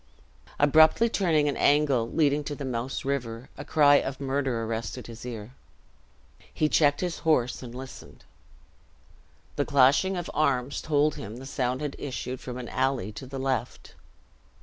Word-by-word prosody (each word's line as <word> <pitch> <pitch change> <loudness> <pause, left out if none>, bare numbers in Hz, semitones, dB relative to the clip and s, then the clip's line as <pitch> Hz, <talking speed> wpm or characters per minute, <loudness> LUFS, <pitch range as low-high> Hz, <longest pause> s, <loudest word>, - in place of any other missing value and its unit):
Abruptly 155 +10 +5
turning 165 -9 +2
an 145 - 0
angle 140 -5 +2
leading 150 -2 +1
to 145 - -4
the 140 - -6
Mouse 125 0 -3
River, 125 -3 -3
a 145 - -7
cry 145 -1 +5
of 135 -1 -3
murder 135 -4 -1
arrested 115 +2 -4
his 115 +1 -9
ear. 115 0 -7 1.0
He 155 - +1
checked 145 -2 +3
his 180 -2 -3
horse 125 -7 +1
and 120 -1 -9
listened. 130 +1 -11 1.3
The 145 - +1
clashing 145 +7 +3
of 175 - -4
arms 140 -3 0
told 150 -1 +1
him 105 +3 -7
the 130 - -9
sound 130 -1 -2
had 150 -2 -4
issued 130 -2 -5
from 125 -1 -7
an 125 -1 -6
alley 130 -6 -1
to 120 +5 -9
the 135 +1 -7
left. 130 -2 -3
135 Hz, 155 wpm, -27 LUFS, 125-145 Hz, 1.3 s, Abruptly